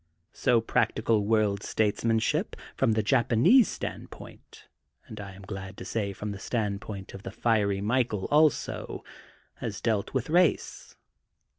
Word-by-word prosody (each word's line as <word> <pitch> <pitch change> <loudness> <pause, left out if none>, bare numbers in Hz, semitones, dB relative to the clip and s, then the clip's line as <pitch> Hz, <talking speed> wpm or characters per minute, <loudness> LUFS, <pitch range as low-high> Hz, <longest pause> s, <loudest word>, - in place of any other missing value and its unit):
So 115 -2 +2
practical 110 -1 +1
world 105 -2 +2
statesmanship, 110 +1 0 0.2
from 115 - +2
the 110 0 +1
Japanese 135 - +4
standpoint - - -9 0.4
and 110 - -10
I 100 -1 -8
am 95 +1 -13
glad 95 -1 -7
to - - -8
say, 100 0 -2
from 105 +1 -5
the 100 - -7
standpoint 100 -3 -4
of 100 - -8
the - - -7
fiery 105 -4 +1
Michael 110 -2 0
also, 150 0 +1 0.5
has 105 -4 -5
dealt 110 -4 -1
with 130 -3 -2
race. 175 +2 +1
110 Hz, 135 wpm, -28 LUFS, 100-115 Hz, 0.5 s, Japanese